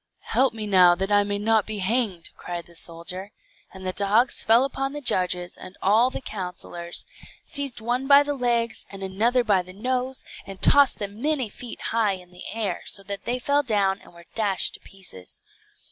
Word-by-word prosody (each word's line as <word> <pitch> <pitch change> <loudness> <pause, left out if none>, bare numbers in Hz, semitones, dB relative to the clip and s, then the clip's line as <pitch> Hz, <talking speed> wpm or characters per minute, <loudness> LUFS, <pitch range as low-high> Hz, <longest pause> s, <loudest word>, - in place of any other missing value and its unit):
"Help 265 +1 +4
me 220 -1 -5
now, 180 -3 +6
that 195 +3 -2
I 205 0 +5
may 205 0 -2
not 220 0 +2
be 215 -1 -3
hanged," 200 -3 -1
cried 175 -1 -6
the 170 - -18
soldier. 180 +4 -5 0.4
And 190 -1 -10
the 185 - -1
dogs 210 +6 +3
fell 230 +4 +5
upon 270 0 -3
the 295 - -4
judges 180 -8 0
and 185 - -12
all 220 +6 +4
the 260 - -6
councillors; 180 -5 -4 0.4
seized 280 -5 +1
one 245 +4 -1
by 280 0 +8
the 290 0 -2
legs, 235 -3 -1
and 195 -1 -8
another 225 +6 +1
by 205 -5 +3
the 185 +1 -11
nose, 255 +5 -2 0.2
and 195 -1 -9
tossed 285 -2 +5
them 205 +1 -6
many 285 -5 0
feet 240 +3 -8
high 220 -3 +2
in 180 -1 -10
the 180 - -8
air, 210 -6 -2
so 195 - -2
that 200 0 -6
they 245 +2 0
fell 285 +3 +2
down 200 -6 +1
and - - -17
were 170 0 -16
dashed 205 -4 +2
to - - -6
pieces. 185 - -9
205 Hz, 195 wpm, -24 LUFS, 185-245 Hz, 0.4 s, by